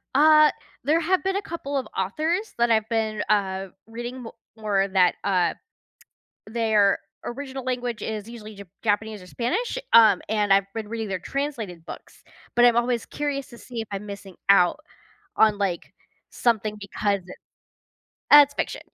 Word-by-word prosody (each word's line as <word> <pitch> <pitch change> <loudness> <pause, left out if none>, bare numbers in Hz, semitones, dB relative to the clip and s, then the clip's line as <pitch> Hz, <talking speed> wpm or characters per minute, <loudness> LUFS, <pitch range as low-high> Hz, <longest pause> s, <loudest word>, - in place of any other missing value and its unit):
Uh, 305 +1 +7 0.3
there 305 +5 +3
have 365 +3 +1
been 385 0 0
a 400 - 0
couple 320 -7 -5
of 265 - -3
authors 315 - -1
that 235 0 +2
I've 220 -1 +2
been, 220 -2 -1
uh, 195 -2 0 0.2
reading 240 +3 -7
mo 225 - -9 0.2
more 205 -3 0
that, 190 -2 +3
uh, 185 -3 +1 0.9
their 215 -3 +2 0.3
original 265 +1 -6
language 245 -3 -3
is 215 -1 -4
usually 215 -3 -10
Jap 200 0 -10 0.2
Japanese 215 0 -1
or - - -13
Spanish, 365 - -2 0.2
um 225 -2 +7
and 210 -2 +1
I've 195 0 +4
been 220 -2 -5
reading 225 -1 -4
their 190 -1 -2
translated 225 - -4
books, - - -11 0.3
but 240 - +5
I'm 240 -1 +4
always 240 0 0
curious 285 -2 -3
to 240 - -13
see 240 -2 -7
if 220 - -6
I'm 200 0 -5
missing 200 -2 -9
out 190 +6 +5 0.6
on, 215 -2 +4
like, 190 -4 -3 0.4
something 220 -3 0
because 200 0 -1
it's 180 0 -13 0.9
Uh 295 - +11
it's 285 +1 -16
fiction. - - -3
225 Hz, 165 wpm, -24 LUFS, 200-260 Hz, 0.9 s, Uh